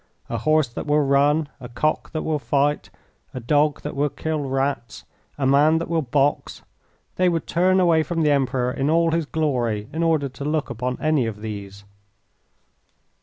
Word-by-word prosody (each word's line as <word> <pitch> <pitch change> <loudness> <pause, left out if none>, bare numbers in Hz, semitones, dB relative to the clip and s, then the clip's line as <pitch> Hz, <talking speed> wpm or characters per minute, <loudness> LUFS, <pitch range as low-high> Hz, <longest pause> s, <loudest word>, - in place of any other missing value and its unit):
A - - -2
horse 155 -1 +2
that 120 - -7
will 150 0 +3
run, 145 +3 +2
a 125 -2 -9
cock 145 +6 -1
that 155 - -4
will 155 -2 -1
fight, 140 +3 0 0.5
a - - -3
dog 145 +4 +1
that 150 - -5
will 145 +1 +1
kill 150 -1 -3
rats, 135 -2 -2 0.3
a 140 - -1
man 145 +4 +4
that 165 - -4
will 165 -1 +1
box 140 +1 -1 0.5
they 185 0 +3
would 165 -2 -2
turn 185 +2 +2
away 170 -3 +4
from 165 0 -1
the 150 - +3
Emperor 130 -3 +1
in 135 +2 -1
all 165 +1 +3
his 165 -2 -1
glory 120 -10 -1
in 160 - -2
order 160 -4 +2
to 135 +1 -9
look 150 +1 -1
upon 125 +2 -3
any 155 -6 +1
of 105 -2 -6
these. 100 -2 -7
145 Hz, 180 wpm, -22 LUFS, 130-155 Hz, 0.5 s, man